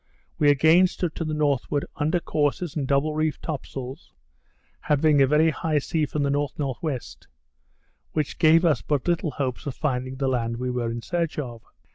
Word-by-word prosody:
We 145 - +5
again 160 +6 +5
stood 175 -3 -3
to - - -4
the 155 -1 -2
northward, 145 -1 0
under 155 +4 +1
courses 150 +1 -1
and 140 -4 -2
double 140 +3 +1
reefed 155 0 -1
top 155 -5 -4
sails, 130 +3 -8 0.7
having 150 0 +3
a 135 - +5
very 155 +3 +4
high 155 0 -1
sea 150 +1 0
from 145 +1 -2
the 140 - +1
N.N.W., 145 0 -2 1.1
which 155 -2 -2
gave 165 +2 +5
us 150 -8 +3
but 145 -1 -1
little 170 -2 +1
hopes 135 -1 -3
of 135 - -4
finding 130 -3 -2
the 135 0 -1
land 115 -3 -1
we 125 +1 -2
were 120 -2 -1
in 115 0 -5
search 170 -3 -2
of. 120 -6 -5
145 Hz, 180 wpm, -25 LUFS, 130-155 Hz, 1.1 s, We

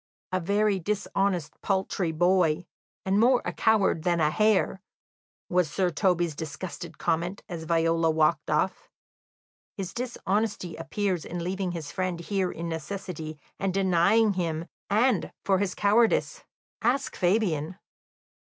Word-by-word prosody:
"A 185 - +1
very 200 +2 +1
dishonest, 195 -2 -1
paltry 190 -3 0
boy, 175 0 +2 0.4
and 195 +2 +2
more 245 +2 +5
a - - -2
coward 215 -7 +2
than 170 0 +1
a 155 -1 +3
hare," 210 -1 +2 0.7
was 180 -3 +2
Sir 180 +3 0
Toby's 175 -2 +1
disgusted 160 +2 -7
comment, 175 +3 -1
as 165 -3 -6
Viola 165 0 +2
walked 155 0 +2
off. 170 +5 0 0.9
"His 190 -2 -4
dishonesty 215 -6 -2
appears 180 +2 -2
in 175 -1 -5
leaving 185 0 -2
his 160 -4 -6
friend 185 -2 -2
here 185 +1 -1
in 170 +1 -5
necessity, 160 -1 -5 0.2
and 195 -1 -1
denying 195 +3 +4
him; 165 -3 -2 0.2
and 220 0 +2
for 190 -2 +3
his 195 -2 -1
cowardice, 225 - +2 0.4
ask 265 +4 0
Fabian." 180 -4 +1
180 Hz, 130 wpm, -27 LUFS, 165-200 Hz, 0.9 s, more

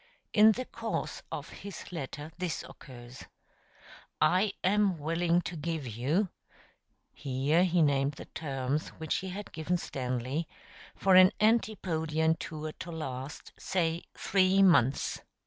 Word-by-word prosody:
In 215 0 +7
the 255 +4 -4
course - - -4
of - - -5
his 200 -3 -9
letter 150 -1 -6
this 175 -4 -3
occurs: 120 -1 -12 0.9
"I 185 +5 +3
am 200 -1 +3
willing 165 +3 +1
to 175 - -6
give 160 -1 -3
you" 135 - 0 0.8
[here 140 +5 +1
he 175 -2 +3
named 140 -1 +2
the - - -10
terms 140 -1 -3
which 160 -2 -1
he 190 - -4
had 200 +3 -7
given 165 +3 -1
Stanley] 130 +2 -3 0.5
"for 195 - +3
an 185 0 +9
antipodean 160 -8 +2
tour 155 -1 -5
to 175 -1 -6
last, 135 -3 -6
say, 170 -3 0
three 195 0 +3
months." 140 -8 +3
160 Hz, 130 wpm, -30 LUFS, 140-185 Hz, 0.9 s, an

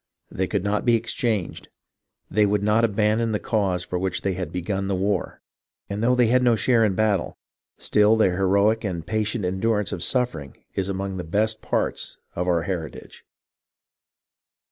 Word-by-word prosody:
They 95 +1 -1
could 100 -1 -1
not 105 +1 0
be 120 -2 +4
exchanged, 115 -4 -2 0.6
they 105 -1 +2
would 100 0 0
not 105 +2 +3
abandon 110 +1 +1
the 105 - 0
cause 95 -5 0
for 90 - -3
which 95 -1 -2
they 95 - 0
had 90 0 -4
begun 95 +2 -2
the 95 - 0
war, 95 -1 -2 0.5
and 100 +1 -3
though 125 +2 +3
they 125 -1 +4
had 125 +3 +3
no 120 -2 +4
share 115 +1 +3
in 100 -4 +1
battle, 105 -3 0 0.4
still 105 +1 +3
their 95 -5 +3
heroic 100 +4 +2
and 85 -6 -3
patient 110 -1 -1
endurance 105 +2 0
of 85 - -4
suffering 90 - -1 0.2
is 95 0 -2
among 95 0 -3
the 90 - -4
best 110 +6 0
parts - - -2 0.2
of 90 +1 -2
our 85 -2 +2
heritage. 85 -5 -6
100 Hz, 170 wpm, -24 LUFS, 95-110 Hz, 0.6 s, be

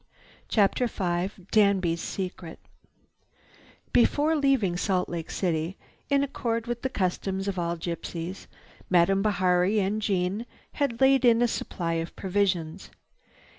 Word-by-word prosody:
CHAPTER 215 +3 +2
V 180 -4 -1 0.2
DANBY'S 190 -6 +3
SECRET 180 -3 -5 1.4
Before 295 +6 +3
leaving 270 - +2
Salt 180 0 0
Lake 165 -2 -5
City, 170 0 -1 0.3
in 280 -1 +3
accord 230 -4 -2
with 240 -1 -4
the 265 - -1
customs 190 -2 -2
of 190 -2 -2
all 170 0 -1
gypsies, 170 +2 -5 0.4
Madame 185 +2 +4
Bihari 190 0 +2
and 205 +2 0
Jeanne 200 +2 -1 0.2
had 270 -4 -2
laid 265 -1 +5
in 235 -1 +5
a - - +4
supply 170 -6 -3
of 165 - -7
provisions. 185 -3 -1
195 Hz, 125 wpm, -27 LUFS, 175-230 Hz, 1.4 s, laid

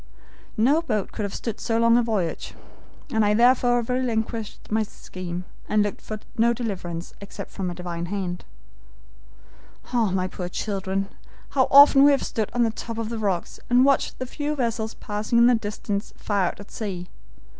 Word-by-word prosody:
No 275 +9 +4
boat 215 - -2
could - - -5
have 200 - -5
stood 230 -3 -4
so 225 - 0
long 230 0 +5
a 240 - +5
voyage. 210 -8 -2 0.6
I 210 -1 +3
therefore 245 0 +4
relinquished 230 -4 -2
my 220 +1 +2
scheme, 180 -4 -6 0.3
and 210 0 +3
looked 205 - -4
for 215 -1 -6 0.2
no 235 +1 +5
deliverance 185 -8 -5
except 200 - -8
from 185 -2 -3
a 175 - -5
divine 175 -1 -4
hand. 185 -2 -3 1.5
"Ah, 230 -4 +3
my 185 0 0
poor 180 -1 -5
children! 195 0 -2 0.4
how 260 -2 +2
often 280 0 +9
we 285 - +8
have 280 -1 +3
stood 220 -2 -2
on 240 - +2
the 225 - +2
top 230 +1 -6
of 225 -1 -3
the 230 -1 -4
rocks 195 -5 -2
and 245 +2 +5
watched 275 -1 +2
the 255 - -4
few 295 +3 -3
vessels 230 -4 -2
passing 210 +3 -2
in 235 - +7
the 245 - +6
distance 205 -2 -3
far 200 -3 0
out - - -5
at 200 - -12
sea. 185 -5 -5
220 Hz, 175 wpm, -24 LUFS, 195-240 Hz, 1.5 s, often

